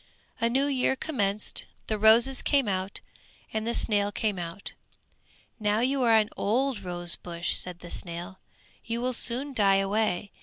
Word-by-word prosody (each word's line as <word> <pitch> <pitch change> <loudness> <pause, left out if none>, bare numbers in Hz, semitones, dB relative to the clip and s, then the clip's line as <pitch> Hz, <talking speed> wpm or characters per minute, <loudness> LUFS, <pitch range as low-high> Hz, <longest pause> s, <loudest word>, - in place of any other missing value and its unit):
A 230 0 +2
new 265 +4 +2
year 265 -2 +1
commenced; 210 -9 -1 0.2
the 215 -1 -2
roses 235 +5 +6
came 275 -5 +2
out, 190 0 -3 0.5
and 220 +1 -2
the 235 - -1
snail 205 -1 +1
came 205 -2 -1
out. 170 +3 -7 0.9
"Now 210 +1 +1
you 265 +2 +1
are 230 -2 +5
an 215 0 +3
old 250 +3 0
rose 175 -2 -1
bush," 170 0 -2
said 180 -1 -3
the 175 - -10
snail, 175 +2 -6 0.4
"you 230 0 -3
will 255 +1 -1
soon 255 +4 -2
die 200 -5 +4
away. 200 0 0
215 Hz, 160 wpm, -27 LUFS, 195-245 Hz, 0.9 s, roses